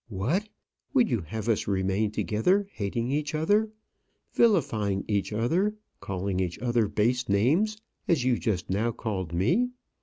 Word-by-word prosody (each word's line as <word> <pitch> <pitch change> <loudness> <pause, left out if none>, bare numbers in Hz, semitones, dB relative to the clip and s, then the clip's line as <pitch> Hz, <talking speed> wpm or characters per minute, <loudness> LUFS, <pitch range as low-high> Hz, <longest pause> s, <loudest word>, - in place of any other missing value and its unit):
"What! 135 - -1 0.5
would 245 -4 +4
you 115 - +1
have 110 +5 -5
us 115 -3 +1
remain 95 +2 +1
together, 180 - +1
hating 115 +4 -2
each 150 +1 -1
other, 205 +8 +2 0.6
vilifying 110 - +2
each 100 -1 0
other, 170 - +1 0.2
calling 95 0 -3
each 90 -2 -2
other 120 -3 +1
base 120 +5 0
names 155 - +2 0.3
as 160 -7 +2
you 125 -1 +2
just 95 -5 -1
now 105 +5 0
called 100 -7 -4
me? 125 - +2
115 Hz, 145 wpm, -27 LUFS, 100-160 Hz, 0.6 s, would